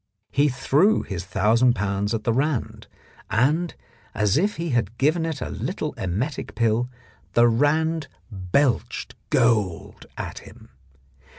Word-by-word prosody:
He 145 +1 +3
threw 150 +10 +2
his 90 -3 -5
thousand 115 +6 +3
pounds 100 +1 -1
at 110 - -4
the 115 - +1
Rand, 135 0 -1 0.4
and, 145 - +1 0.4
as 105 0 +2
if 200 +7 +1
he 170 +1 -3
had 115 -2 -1
given 160 +4 +2
it 155 -5 -4
a - - -3
little - - -3
emetic 105 - -3
pill, 115 +1 +1 0.4
the 120 0 +5
Rand 155 +6 +1 0.2
belched 105 +8 0 0.2
gold 105 -7 +1
at - - -5
him. - - -15
120 Hz, 130 wpm, -24 LUFS, 105-150 Hz, 0.4 s, the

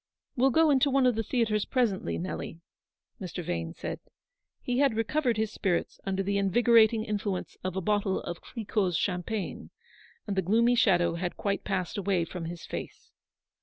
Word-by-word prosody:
" - - -58
We'll 265 +1 +4
go 320 +3 +4
into 275 0 +4
one 270 -1 +3
of 250 - +4
the 225 - -1
theatres 220 -2 0
presently, 200 - 0
Nelly," 85 - -5 0.6
Mr. 180 -1 -5
Vane 85 - -3
said. - - -5 0.6
He 250 0 -1
had 275 -5 +3
recovered 240 +1 0
his 220 -1 0
spirits 180 -5 -1
under 195 0 0
the 200 +1 0
invigor 230 +4 +5
ating 220 0 +2
influence 205 -3 -3
of 185 -1 -3
a 190 - -1
bottle 205 0 +1
of 175 - -6
Cliquot's 205 -6 -1
champagne, 185 +2 -3 0.6
and 200 - -3
the 190 - +2
gloomy 230 +7 +3
shadow 175 -7 +3
had 175 +1 -3
quite 200 -1 -1
passed 190 0 -2
away 190 -4 +1
from 170 0 -6
his 170 +1 -7
face. - - -7
200 Hz, 175 wpm, -28 LUFS, 180-230 Hz, 0.6 s, invigor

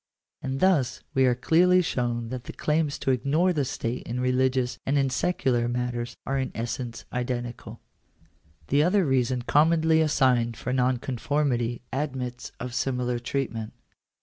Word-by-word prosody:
And 135 0 -3
thus 145 -11 +2
we 130 -1 +4
are 125 - +3
clearly 180 +8 +4
shown 120 -6 -2
that 125 -1 -6
the - - -7
claims 150 -1 0
to 135 - 0
ignore 155 +8 +2
the 150 -4 +1
state 125 -2 -3
in 120 +1 -3
religious 125 0 +1
and 140 +2 +1
in 135 -1 +2
secular 130 -6 +1
matters 120 0 -3
are 135 0 0
in 130 - -2
essence 115 0 -4
identical. 120 -1 -4 0.9
The 140 +2 +4
other 185 +4 +3
reason 130 -2 +1
commonly 160 +3 +4
assigned 125 -6 +2
for 125 - -3
nonconformity, 125 -1 0
admits 130 -3 -3
of 125 -1 -5
similar 125 -1 -1
treatment. 120 -3 -3
130 Hz, 145 wpm, -26 LUFS, 120-145 Hz, 0.9 s, we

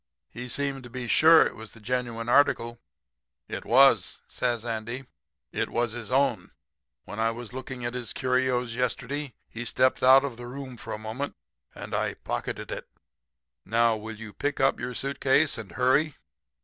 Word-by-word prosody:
He 125 +1 -7
seemed 140 0 -1
to 120 - -11
be 125 0 -5
sure 160 +7 +7
it - - -3
was 110 0 -10
the 115 - -13
genuine 120 0 -2
article.' 120 -3 +3 0.7
"'It - - -5
was,' 120 -4 +5
says 120 -2 -1
Andy. 120 +3 -4 0.5
'It - - -1
was 120 -1 0
his 115 -1 -6
own. 125 -8 +1 0.6
When 105 - -7
I 115 0 +3
was 115 0 -7
looking 130 -1 -6
at 120 - -2
his 125 -3 -4
curios 125 -2 0
yesterday 125 +3 -2
he 115 - -6
stepped 130 +2 +2
out 130 +2 +7
of 130 -5 -5
the 120 0 -8
room 130 0 -7
for - - -8
a - - -3
moment 110 +6 -5 0.4
and - - -8
I - - 0
pocketed - - -4
it. - - -6 0.7
Now, 115 +1 +3
will 110 0 -7
you 105 -1 -9
pick 145 0 -2
up 135 0 +3
your 125 +1 -4
suit 140 +3 -3
case 140 0 +3
and 95 -5 -9
hurry?' 135 - +2
125 Hz, 175 wpm, -27 LUFS, 115-135 Hz, 0.7 s, sure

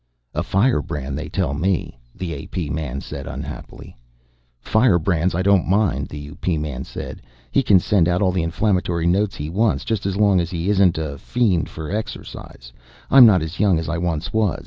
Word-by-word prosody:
"A - - -1
firebrand, 75 - 0
they 80 +1 -5
tell 85 -5 -1
me," 85 -5 -1 0.2
the 90 -3 -4
A.P. 75 +2 -5
man 70 -3 -3
said 70 -1 -7
unhappily. - - -8 0.6
"Firebrands 90 - +2
I 95 - 0
don't 100 -3 +3
mind," 100 +2 +1
the 75 - -7
U.P. 75 +4 -3
man 75 -4 -4
said. - - -8 0.3
"He - - +3
can 105 -7 +5
send 90 -2 +2
out 90 +1 +1
all 95 -2 +2
the 90 -1 0
inflammatory 90 -1 0
notes 95 +3 +1
he 75 - -5
wants 105 +7 0
just 105 -4 -1
as 100 0 -2
long 100 -3 +4
as 85 -1 -1
he 90 +3 -1
isn't 95 -4 +3
a 75 -3 -4
fiend 110 -9 0
for 80 0 -7
exercise. 65 - -7 0.4
I'm 130 -3 +9
not 95 -7 +4
as 80 +2 -6
young 100 -4 +3
as 80 0 -3
I 85 +1 -2
once 85 -3 -2
was. 110 -5 +1
90 Hz, 190 wpm, -21 LUFS, 80-100 Hz, 0.6 s, I'm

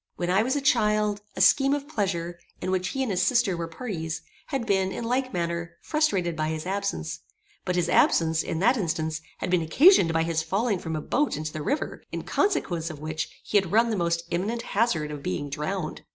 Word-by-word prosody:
When 175 0 -1
I 190 +3 +4
was 255 +5 0
a 285 - 0
child, 210 -6 +2
a - - -2
scheme 275 0 +5
of 285 0 -5
pleasure, 175 - -2 0.2
in 185 - -2
which 185 -1 0
he 270 +7 -1
and 245 - -2
his 185 -1 +1
sister 230 -3 +3
were 170 -1 -3
parties, 165 -4 -5 0.2
had 270 -5 -2
been, 190 -3 +1
in - - -4
like 255 +2 0
manner, 170 -1 -3
frustrated 195 - +1
by 155 -1 -1
his 155 0 -3
absence; 180 - -2 0.5
but 180 - 0
his 175 -1 +1
absence, 160 -1 +3
in 160 - -3
that 245 +6 +4
instance, 160 -4 -2 0.2
had - - -3
been 180 -2 +3
occasioned 190 - +6
by 165 0 +2
his 165 -1 0
falling 195 +5 0
from 160 -2 -4
a 155 - -2
boat 285 - 0
into 155 0 -4
the 155 - -4
river, 285 - -2
in - - -4
consequence 175 - 0
of 155 - -7
which 155 +1 -3
he 210 - +1
had 190 -3 -5
run 230 +2 +4
the - - 0
most 170 -2 0
imminent 210 +7 -1
hazard 180 -9 +1
of 145 -1 -6
being 140 +7 -3
drowned. 155 +3 -3
180 Hz, 215 wpm, -26 LUFS, 160-230 Hz, 0.5 s, occasioned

